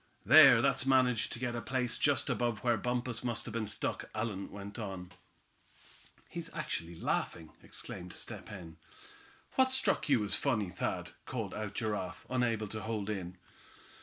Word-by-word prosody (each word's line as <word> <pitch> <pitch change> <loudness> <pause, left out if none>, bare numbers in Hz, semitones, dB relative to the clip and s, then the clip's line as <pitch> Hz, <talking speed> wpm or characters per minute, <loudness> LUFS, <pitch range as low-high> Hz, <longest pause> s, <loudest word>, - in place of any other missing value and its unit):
"There, - - +9
Thad's 130 - +2
managed 130 -4 +3
to - - -5
get 125 0 -2
to 120 - -3
a - - -6
place 125 0 0
just - - +3
above 120 -3 0
where 120 -1 +3
Bumpus 125 0 -2
must 120 -2 +1
have - - -6
been 115 -2 -2
stuck," - - -2
Allan 110 -3 -3
went 100 +2 -8
on. 95 -4 -6 1.2
"He's - - -6
actually 85 +1 -4
laughing!" 80 0 -2
exclaimed 90 -1 -6
Step - - -5
Hen. 85 -6 -9 0.8
"What's 260 0 +5
struck 265 - +1
you 125 -6 +4
as 100 -1 +1
funny, 105 -7 +1
Thad?" 90 - -3 0.2
called - - -3
out 105 -1 -5
Giraffe, 105 -6 -3
unable 115 -4 +1
to 110 +1 -4
hold 110 -2 -2
in. 90 -3 -5
110 Hz, 165 wpm, -33 LUFS, 95-120 Hz, 1.2 s, There